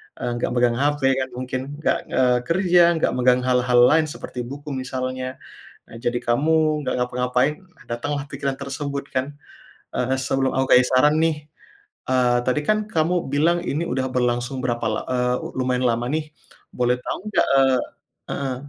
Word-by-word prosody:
Eee, 120 Hz, -, -3 dB
gak -, -, 0 dB
megang 120 Hz, -1 st, +2 dB
HP 145 Hz, +1 st, +1 dB, 0.2 s
kan 130 Hz, -, -1 dB
mungkin, 130 Hz, 0 st, -3 dB, 0.2 s
nggak, -, -, +1 dB
eee, 125 Hz, -1 st, +2 dB
kerja, 175 Hz, -1 st, +4 dB
nggak 160 Hz, -, +1 dB
megang 125 Hz, 0 st, +3 dB
hal-hal 125 Hz, -1 st, +3 dB
lain 155 Hz, +5 st, +4 dB
seperti 150 Hz, -4 st, -8 dB
buku 145 Hz, +2 st, -8 dB
misalnya. 130 Hz, -1 st, -4 dB, 0.5 s
Eee, -, -, -13 dB
jadi 120 Hz, 0 st, 0 dB
kamu 150 Hz, +5 st, +1 dB
nggak -, -, -1 dB
ngapa-ngapain, 125 Hz, +3 st, +1 dB, 0.3 s
datanglah 145 Hz, +5 st, -3 dB
pikiran 140 Hz, -1 st, -4 dB
tersebut 140 Hz, 0 st, -4 dB
kan. 140 Hz, +2 st, -4 dB, 0.6 s
Eee, 130 Hz, +1 st, 0 dB
sebelum 135 Hz, 0 st, 0 dB
aku 130 Hz, 0 st, +3 dB
kasih 125 Hz, -, +6 dB
saran 150 Hz, +4 st, +4 dB
nih, 150 Hz, -2 st, -1 dB, 0.6 s
eee, 125 Hz, -1 st, +3 dB
tadi 125 Hz, -, +2 dB
kan 215 Hz, 0 st, +2 dB
kamu 165 Hz, -4 st, 0 dB
bilang 165 Hz, +4 st, +2 dB
ini 160 Hz, -2 st, -2 dB
udah 130 Hz, +1 st, -1 dB
berlangsung 125 Hz, +1 st, -1 dB
berapa 120 Hz, -2 st, -1 dB
la 110 Hz, -, -1 dB
eee, 125 Hz, -1 st, +1 dB
lu 130 Hz, -, -3 dB
lumayan 125 Hz, 0 st, 0 dB
lama 120 Hz, +1 st, 0 dB
nih, 155 Hz, 0 st, -2 dB, 0.5 s
boleh 125 Hz, 0 st, +1 dB
tau -, -, -4 dB
nggak, -, -, +2 dB
eee 135 Hz, -2 st, +4 dB, 0.5 s
heeh, 135 Hz, -2 st, -2 dB
130 Hz, 165 wpm, -22 LUFS, 125-145 Hz, 0.6 s, kasih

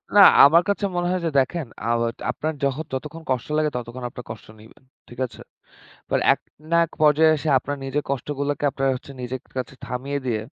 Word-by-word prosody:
না, 205 Hz, -, +9 dB, 0.2 s
আমার 165 Hz, +4 st, +6 dB
কাছে 200 Hz, 0 st, 0 dB
মনে 175 Hz, 0 st, 0 dB
হয় 185 Hz, -1 st, -1 dB
যে 165 Hz, -, +1 dB
দেখেন 140 Hz, +2 st, -1 dB, 0.2 s
আ -, -, 0 dB, 0.4 s
আপনার 155 Hz, +1 st, -3 dB
যহত 140 Hz, +3 st, -1 dB
যতক্ষণ 150 Hz, +5 st, -5 dB
কষ্ট 125 Hz, -2 st, -1 dB
লাগে 155 Hz, 0 st, +2 dB
ততক্ষণ 125 Hz, +1 st, -6 dB
আপনার 125 Hz, -2 st, -10 dB
কষ্ট 110 Hz, -, -10 dB
নিবেন। 110 Hz, +4 st, -18 dB, 0.3 s
ঠিক 120 Hz, -, -12 dB
আছে? 120 Hz, -, -12 dB, 0.7 s
বাট -, -, +2 dB
এক -, -, -9 dB, 0.3 s
না 170 Hz, -, +4 dB
এক 165 Hz, -, -21 dB
পর্যায়ে 155 Hz, +1 st, +5 dB
এসে 155 Hz, +1 st, -3 dB
আপনার 145 Hz, +3 st, -5 dB
নিজের 135 Hz, +2 st, -2 dB
কষ্টগুলোকে 140 Hz, +2 st, -2 dB
আপনারা 135 Hz, 0 st, 0 dB, 0.3 s
নিজের 125 Hz, +1 st, -4 dB, 0.2 s
কাছে 130 Hz, +1 st, -4 dB
থামিয়ে 135 Hz, +3 st, -3 dB
দিয়ে, 115 Hz, -4 st, -1 dB
140 Hz, 190 wpm, -23 LUFS, 125-155 Hz, 0.7 s, না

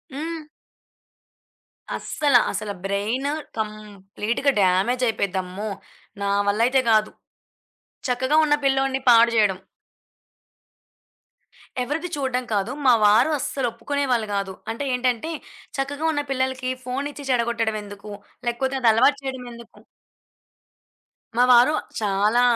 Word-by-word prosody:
హ్మ్. 325 Hz, +3 st, -4 dB, 1.6 s
అస్సల, 290 Hz, -4 st, 0 dB, 0.2 s
అసల 215 Hz, -1 st, -4 dB
బ్రైను 215 Hz, +8 st, -1 dB, 0.3 s
కంప్లీట్‌గా 215 Hz, +4 st, -2 dB
డామేజయిపోద్ది 200 Hz, +1 st, +1 dB
అమ్మో! 190 Hz, +4 st, -6 dB, 0.5 s
నా 200 Hz, -, 0 dB, 0.2 s
వల్ల 200 Hz, +2 st, +1 dB
అయితే 265 Hz, +1 st, +3 dB
గాదు. 215 Hz, -1 st, +3 dB, 1.0 s
చక్కగా 260 Hz, +5 st, +1 dB
ఉన్న 295 Hz, -, +2 dB
పిల్లోడిని 270 Hz, 0 st, +2 dB
పాడుజేయడం. 230 Hz, -4 st, +5 dB, 2.3 s
ఎవరిది 320 Hz, +7 st, -3 dB
చూడడం 260 Hz, -3 st, -1 dB
కాదు. 205 Hz, +3 st, 0 dB
మా 255 Hz, -, +7 dB
వారు 210 Hz, +8 st, +5 dB
అస్సలు 265 Hz, -1 st, -2 dB
ఒప్పుకునేవాళ్ళు 245 Hz, -1 st, -1 dB
గాదు. 195 Hz, -1 st, -2 dB, 0.2 s
అంటే 230 Hz, +5 st, -4 dB
ఏంటంటే, 250 Hz, +3 st, 0 dB, 0.5 s
చక్కగా 285 Hz, +3 st, -2 dB
ఉన్న 290 Hz, -2 st, -1 dB
పిల్లలకి 260 Hz, -1 st, -1 dB
ఫోనిచ్చి 280 Hz, +3 st, -4 dB
చెడగొట్టడం 235 Hz, -2 st, 0 dB
ఎందుకు, 205 Hz, 0 st, -10 dB, 0.4 s
లేకపోతే 260 Hz, +3 st, -1 dB
అదలవాటు 245 Hz, +5 st, +4 dB
చేయడం 260 Hz, -2 st, -5 dB
ఎందుకు. 235 Hz, 0 st, -14 dB, 1.6 s
మా 245 Hz, -, +6 dB
వారు 245 Hz, +4 st, +6 dB, 0.3 s
చాలా, 210 Hz, +3 st, +2 dB
240 Hz, 100 wpm, -23 LUFS, 215-270 Hz, 2.3 s, మా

